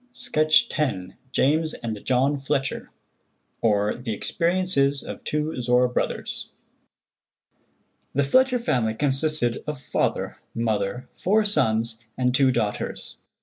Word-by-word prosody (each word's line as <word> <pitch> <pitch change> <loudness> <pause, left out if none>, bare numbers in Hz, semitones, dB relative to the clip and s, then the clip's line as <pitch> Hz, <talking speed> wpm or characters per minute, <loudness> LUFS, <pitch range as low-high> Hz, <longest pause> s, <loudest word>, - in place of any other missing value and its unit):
Sketch 155 -12 +3
X. 95 -11 -1 0.2
JAMES 155 +5 +2
AND 110 -3 -5
JOHN 135 +3 +2
FLETCHER; 135 0 -2 0.7
OR, 105 -2 +2
THE 120 -3 -4
EXPERIENCES 170 - +1
OF - - -8
TWO 150 -3 -2
ZORRA 125 +1 +3
BROTHERS. 125 - -3 1.7
The 140 - +3
Fletcher 255 - +3
family 120 - 0
consisted 135 -2 +1
of 150 -3 -4
father, - - -1 0.2
mother, 110 +1 -1
four 210 +3 +2
sons, 115 - +2 0.2
and 125 -1 +1
two 130 0 +4
daughters. 110 -4 -3
135 Hz, 110 wpm, -24 LUFS, 115-155 Hz, 1.7 s, two